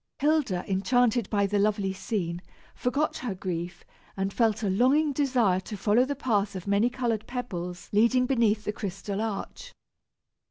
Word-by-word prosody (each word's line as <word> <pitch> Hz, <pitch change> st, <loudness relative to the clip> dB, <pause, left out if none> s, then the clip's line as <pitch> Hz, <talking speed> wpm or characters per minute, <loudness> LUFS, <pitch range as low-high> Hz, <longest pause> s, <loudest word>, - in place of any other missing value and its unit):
Hilda, 285 Hz, -, +1 dB
enchanted 230 Hz, +3 st, +2 dB
by 200 Hz, -2 st, +2 dB
the 205 Hz, +1 st, 0 dB
lovely 200 Hz, -2 st, +1 dB
scene, 180 Hz, -4 st, -3 dB, 0.3 s
forgot 280 Hz, +5 st, -1 dB
her 235 Hz, -7 st, -4 dB
grief, 175 Hz, -1 st, -5 dB, 0.3 s
and 195 Hz, 0 st, -1 dB
felt 225 Hz, -2 st, +1 dB
a 200 Hz, -, +1 dB
longing 275 Hz, +8 st, +3 dB
desire 250 Hz, -9 st, +2 dB
to 205 Hz, +2 st, -7 dB
follow 215 Hz, +6 st, +3 dB
the 285 Hz, +1 st, -3 dB
path 210 Hz, -7 st, 0 dB
of 185 Hz, -, -6 dB
many 200 Hz, +4 st, +2 dB
colored 240 Hz, -4 st, -2 dB
pebbles 180 Hz, -8 st, -5 dB
leading 235 Hz, +4 st, +4 dB
beneath 230 Hz, -5 st, +2 dB
the 210 Hz, -, -2 dB
crystal 200 Hz, 0 st, -4 dB
arch. 225 Hz, -, -5 dB
215 Hz, 155 wpm, -27 LUFS, 195-250 Hz, 0.3 s, leading